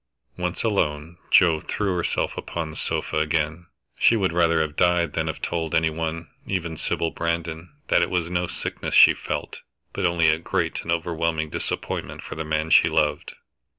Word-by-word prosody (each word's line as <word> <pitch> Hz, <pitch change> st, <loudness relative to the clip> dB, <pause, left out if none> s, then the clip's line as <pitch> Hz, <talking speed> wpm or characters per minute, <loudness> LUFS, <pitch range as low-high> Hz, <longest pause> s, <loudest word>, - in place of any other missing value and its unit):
Once 90 Hz, 0 st, -3 dB
alone, 85 Hz, -6 st, -1 dB
Joe 80 Hz, -3 st, +5 dB
threw 100 Hz, +3 st, -2 dB
herself 85 Hz, -, -1 dB
upon 80 Hz, -2 st, -4 dB
the -, -, -11 dB
sofa -, -, -2 dB
again. 80 Hz, +2 st, -1 dB, 0.3 s
She 115 Hz, -, +5 dB
would 95 Hz, -6 st, +1 dB
rather 85 Hz, -1 st, +3 dB
have 75 Hz, -1 st, -2 dB
died 85 Hz, -3 st, +2 dB
than 80 Hz, 0 st, -1 dB
have 80 Hz, -, -5 dB
told 80 Hz, -2 st, -2 dB
any 80 Hz, 0 st, +2 dB
one, 80 Hz, +1 st, -4 dB, 0.2 s
even 85 Hz, -4 st, -2 dB
Sybil 80 Hz, +1 st, -1 dB
Brandon, 85 Hz, 0 st, -3 dB, 0.2 s
that -, -, +4 dB
it -, -, +1 dB
was 90 Hz, -2 st, 0 dB
no 90 Hz, 0 st, -1 dB
sickness -, -, -4 dB
she -, -, +9 dB
felt, -, -, -5 dB, 0.3 s
but 95 Hz, -3 st, +1 dB
only 85 Hz, -2 st, +3 dB
a 80 Hz, 0 st, +2 dB
great 85 Hz, -, -1 dB
and 85 Hz, -, -4 dB
overwhelming 80 Hz, -2 st, -1 dB
disappointment -, -, -4 dB
for -, -, -7 dB
the 80 Hz, -, -4 dB
man 80 Hz, +1 st, -1 dB
she -, -, +6 dB
loved. 75 Hz, -1 st, 0 dB
85 Hz, 180 wpm, -24 LUFS, 80-85 Hz, 0.3 s, she